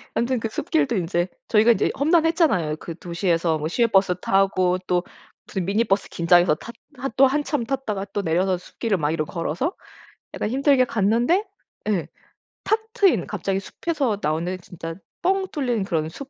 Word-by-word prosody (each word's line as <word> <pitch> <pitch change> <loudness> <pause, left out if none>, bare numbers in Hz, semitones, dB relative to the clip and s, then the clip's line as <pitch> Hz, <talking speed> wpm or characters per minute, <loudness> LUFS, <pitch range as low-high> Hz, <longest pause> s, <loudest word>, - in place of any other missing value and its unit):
완전 245 +1 +1
그 225 0 -3
숲길도 150 -8 0
인제 175 0 0 0.2
저희가 220 +2 +5
인제 - - 0
험난했잖아요. 315 - +2
그 165 +1 -8
도시에서 170 -2 0
뭐 150 - -2
시외버스 195 -2 +2
타고 190 -2 +2
또 180 -1 +1 0.4
무슨 190 -2 -3
미니버스 200 0 +1
긴장해서 175 -1 +4
탔 230 +9 -10 0.2
하 270 - -3
또 270 +1 +7
한참 290 -2 -1
탔다가 230 -7 -2
또 205 - 0
내려서 180 +3 +1
숲길을 200 +3 -2
막 150 -1 0
이렇게 155 -2 -2
걸어서 175 - -2 0.6
약간 - - -2
힘들게 270 0 +4
갔는데 235 - +2 0.4
예 195 -6 0 0.6
탁 435 - +2
트인 390 - +3
갑자기 195 -1 -2
숲에서 270 - -2
나오는 165 +4 -1
진짜 165 -2 -7 0.3
뻥 380 +1 +1
뚫린 245 - -1
그런 160 -4 -1
숲 275 - -9
195 Hz, 345 characters per minute, -23 LUFS, 175-260 Hz, 0.6 s, 또